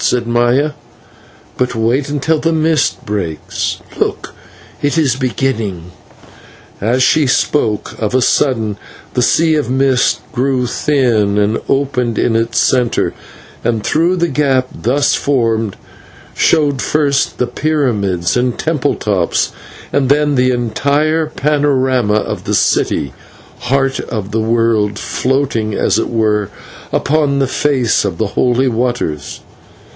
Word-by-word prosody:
said 120 -1 +1
Maya. 120 +5 +2 0.9
"But 125 -1 0
wait 120 +6 0
until 150 +2 0
the 165 +2 0
mist 160 -1 +1
breaks. 95 -7 -3 0.2
Look, - - -2 0.5
it 145 +3 0
is 140 -6 +2
beginning!" 115 - -2 0.9
As 120 +5 +2
she 155 +1 +3
spoke, 110 -5 0
of 110 +3 -1
a 130 - +3
sudden 115 -6 +1 0.4
the 125 - +1
sea 160 +6 +3
of 150 -6 0
mist 130 0 +2
grew 130 0 0
thin 120 -7 +1
and 105 +2 +1
opened 130 -4 0
in 115 - +1
its 115 +1 0
centre, 125 -3 +1 0.5
and 115 -2 0
through 170 +4 +2
the 170 -1 +1
gap 135 -3 +1
thus 135 +5 +1
formed 115 -6 0 0.6
showed 145 -4 +2
first 145 -2 0
the 125 - +1
pyramids 120 - 0
and 125 -1 0
temple 150 -3 0
tops, 95 -5 0 0.4
and 135 -2 +1
then 145 +1 +3
the 130 -1 +2
entire 140 +6 0
panorama 135 -7 +1
of 110 - -3
the - - 0
city 70 -3 +1 0.5
Heart 135 +1 0
of 105 -3 -5
the 110 +1 0
World, 110 -2 +1
floating, 125 -6 -1
as - - +1
it - - -2
were, 105 -3 0 0.4
upon 145 -1 +1
the 135 - +2
face 130 -4 +1
of 95 -5 -3
the 110 +1 -1
Holy 125 +1 +2
Waters. 120 - -2
125 Hz, 130 wpm, -15 LUFS, 110-140 Hz, 0.9 s, she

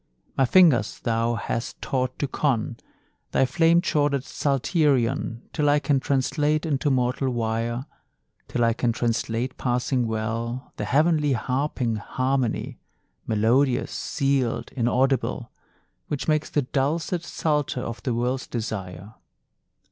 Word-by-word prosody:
My 135 - +3
fingers 140 - +4
thou 115 0 0
hast 115 +2 -4
taught 130 -1 -2
to 145 - -1
con 130 -3 -1 0.6
Thy - - +4
flame 165 +6 +4
chorded 145 -6 +1
psalterion, 135 - 0
Till 150 -2 +2
I 145 - +5
can 145 -1 +1
translate 150 +4 0
into 145 -2 0
mortal 130 0 +1
wire 115 +1 -2 0.6
Till 120 - 0
I 115 0 +3
can 120 0 0
translate 115 +1 -1
passing 125 0 0
well 115 +3 -3
The - - -2
heavenly 150 0 +3
harping 125 -2 -1
harmony, 130 +3 -1 0.5
Melodious, 120 +5 +2
sealed, 135 -5 -1
inaudible, 130 +2 0 0.6
Which 145 - -3
makes 155 -1 +1
the 145 - +1
dulcet 155 +6 -1
psalter 150 -6 -1
of 115 -1 -5
the 125 -3 -1
world's 125 +2 -1
desire. 105 -3 -5
130 Hz, 120 wpm, -25 LUFS, 115-145 Hz, 0.6 s, I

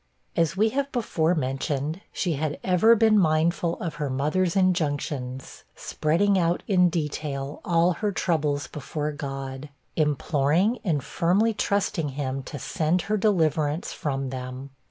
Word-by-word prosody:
As 165 +1 +1
we 220 +2 +4
have 280 +4 -2
before 180 -8 +1
mentioned, 145 +3 -2
she 175 -3 -1
had 150 0 -2
ever 190 +5 +5
been 220 -1 +4
mindful 165 0 +1
of 165 -3 -3
her 145 - -1
mother's 155 +7 0
injunctions, 145 -8 -1
spreading 190 +6 +1
out 170 0 +1
in 180 -3 +4
detail 150 -3 -3
all 170 +1 +3
her 210 +4 -1
troubles 150 -6 0
before 150 +1 -4
God, 135 -1 -6 0.3
imploring 155 - +1
and 155 -8 0
firmly 200 +7 +2
trusting 200 -7 0
him 135 -1 -3
to 140 - -7
send 160 +6 0
her - - +4
deliverance 165 -6 +1
from 135 -3 -3
them. 130 +1 -6
155 Hz, 135 wpm, -25 LUFS, 145-185 Hz, 0.3 s, ever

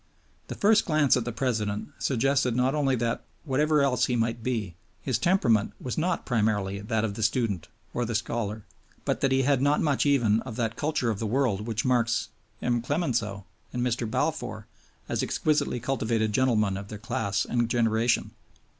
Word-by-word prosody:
The - - -5
first 210 +1 +4
glance 155 -4 +4
at 125 - -1
the 120 - -2
President 110 -4 -2
suggested 130 -1 +1
not 125 +2 +2
only 140 -3 +2
that, 115 -1 -1 0.2
whatever 150 +1 +2
else 125 -3 +2
he 125 - 0
might 115 0 0
be, 110 -7 -2 0.3
his 125 -4 -1
temperament 120 - +2
was 125 - -4
not 170 +2 -1
primarily 105 -4 0
that 110 +1 -1
of 105 - -3
the 110 - -6
student 110 -5 0 0.3
or 120 - -1
the 115 -1 -3
scholar, 110 -1 -2 0.4
but - - -1
that 135 - +2
he 135 0 +3
had 135 -1 +2
not 145 +2 +3
much 145 -2 +1
even 120 -7 +3
of 115 -2 -7
that 115 -2 -1
culture 145 -6 0
of 105 - -4
the 110 - -2
world 115 -3 0
which 110 -1 -2
marks 120 -2 +1 0.3
M. 120 -1 +1
Clemenceau 115 - -1 0.3
and 125 -1 -2
Mr. 120 -2 -1
Balfour 125 -6 -2 0.4
as - - -1
exquisitely 150 -5 0
cultivated 115 -3 0
gentlemen 105 -6 +2
of 100 0 -7
their 105 - -7
class 105 -2 -1
and 120 -1 0
generation. 115 0 +1
120 Hz, 180 wpm, -27 LUFS, 110-135 Hz, 0.4 s, first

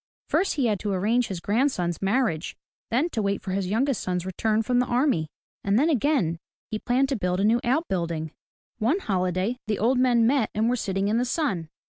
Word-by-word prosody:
First 390 - +1
he 275 -4 +1
had 210 -4 +1
to 210 - -2
arrange 220 +6 +1
his 190 -3 -4
grandson's 200 - 0
marriage; 195 -5 0 0.3
then 280 +9 +1
to 220 - -1
wait 200 -1 0
for 190 - -4
his 190 0 -1
youngest 255 +4 +1
son's 180 -1 -2
return 215 +4 0
from 245 +2 +1
the 250 - +1
army; 245 - +1 0.4
and 200 +1 +2
then 305 +6 +3
again, 250 - +1 0.3
he 215 - -2
planned 260 +4 +1
to 275 - 0
build 180 -4 -1
a - - +1
new 230 +3 +3
out 285 +8 +1
building. 165 -4 -2 0.5
One 240 - +2
holiday 185 - -1
the 215 - 0
old 245 +4 +2
men 245 -3 +4
met 250 -2 +2
and 220 +2 +2
were - - +2
sitting 195 -4 -1
in 220 +3 +1
the - - +1
sun. 245 - -1
220 Hz, 210 wpm, -25 LUFS, 190-250 Hz, 0.5 s, men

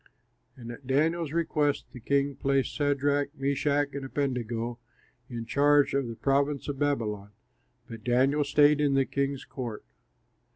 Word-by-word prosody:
And 120 -2 -8
at 125 +2 -11
Daniel's 155 +3 +1
request 155 -3 0
the 125 - -9
king 140 +3 0
placed 135 0 0
Shadrach, 145 0 0
Meshach, 140 +1 0
and 140 0 -5
Abednego 120 -4 -2 0.5
in 120 -2 -5
charge 145 +3 +3
of 140 -2 0
the 115 - -6
province 140 +2 0
of 140 -2 -4
Babylon; 110 -8 -1 0.6
but 115 -2 -9
Daniel 130 +5 +2
stayed 145 +1 +4
in 140 -2 +2
the 135 -1 +3
king's 140 0 -2
court. 120 -6 -6
140 Hz, 140 wpm, -28 LUFS, 125-145 Hz, 0.6 s, stayed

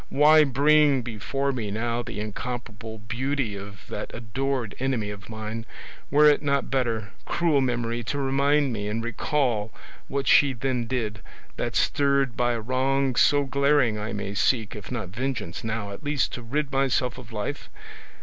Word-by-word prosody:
why 155 +2 +6
bring 145 0 +4
before 135 +5 -2
me 115 -6 -3
now 115 +3 -1
the 110 - -6
incomparable 110 +1 -5
beauty 120 +2 -2
of 100 -1 -9
that - - -5
adored 120 0 -2
enemy 125 -6 -1
of 100 +1 -10
mine? 110 0 -5 0.5
Were 150 +2 +5
it 150 - +5
not 140 -2 0
better, 115 -6 -1
cruel 165 -5 +2
memory, 120 -2 -1
to 145 - -2
remind 140 0 +2
me 105 -2 -3
and 110 +2 -2
recall 120 -2 0 0.4
what 140 0 -2
she 140 -2 +6
then 125 -1 -2
did, 110 -4 -2 0.3
that - - -3
stirred 140 -3 +2
by 120 0 +1
a 115 - -3
wrong 130 +2 +1
so 145 -1 +4
glaring 140 -4 +2
I 105 +2 -4
may 100 -1 -4
seek, 110 0 +1
if 105 +2 -9
not 110 -7 -3
vengeance 115 -4 -4
now, 110 -2 -3
at 100 - -9
least 145 -2 0
to 125 - -5
rid 140 +4 -2
myself 130 -2 +1
of 120 -2 -12
life? 110 +7 -4
125 Hz, 165 wpm, -26 LUFS, 110-140 Hz, 0.5 s, why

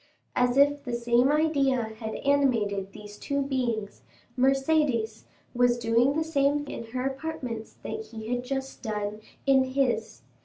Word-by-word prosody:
As 250 +1 +2
if 285 0 +4
the 245 -3 -3
same 240 +3 +3
idea 280 -5 +2 0.2
had 220 -2 -4
animated 225 -9 +1
these 210 +1 -11
two 280 0 -1
beings, 240 -6 -2 0.3
Mercédès 270 -4 +1 0.3
was 245 -1 +3
doing 235 +3 +3
the 320 - +1
same 290 -2 +1
in 230 - -6
her 250 +3 -4
apartments 270 -5 -4
that 440 - -5
he 220 +1 -5
had 245 0 -1
just 270 +1 -4
done 210 -2 -3 0.3
in 270 -1 +5
his. 260 -4 -1
255 Hz, 145 wpm, -27 LUFS, 230-280 Hz, 0.3 s, in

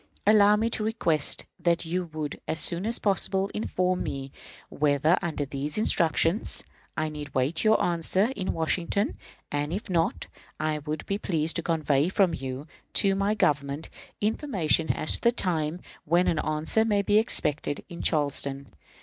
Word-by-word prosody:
Allow 210 0 +6
me 220 +2 0
to 215 - 0
request 170 -9 +1
that 170 -1 +1
you 180 +2 -2
would, 155 -3 -6
as 160 - -1
soon 175 +6 +2
as 235 - +1
possible, 195 -1 0
inform 185 -4 -1
me 135 -1 -5 0.4
whether, 150 +3 +2
under 160 -5 -2
these 140 +4 -3
instructions, 170 -1 +2 0.3
I 155 - 0
need 150 -1 -6
await 130 +5 +1
your 220 0 +4
answer 180 +7 +1
in 190 -2 -2
Washington; 170 +5 0 0.4
and, 145 +1 -2
if 195 +2 -4
not, 165 -2 0 0.3
I 155 0 -1
would 150 +1 -5
be 200 +1 -2
pleased 160 -4 0
to - - -1
convey 155 -2 +1
from 190 -2 +2
you, 130 +2 -5 0.3
to 195 -1 +4
my 200 +2 0
government, 145 -4 0 0.3
information 205 - +1
as 155 - 0
to - - +1
the 235 - +4
time 170 -7 -1 0.2
when 170 +3 +2
an 160 - +1
answer 155 +9 +1
may 205 -3 +1
be 205 +2 +4
expected 150 -10 0
in 170 -2 -8
Charleston. 140 -2 0
165 Hz, 160 wpm, -26 LUFS, 150-200 Hz, 0.4 s, Allow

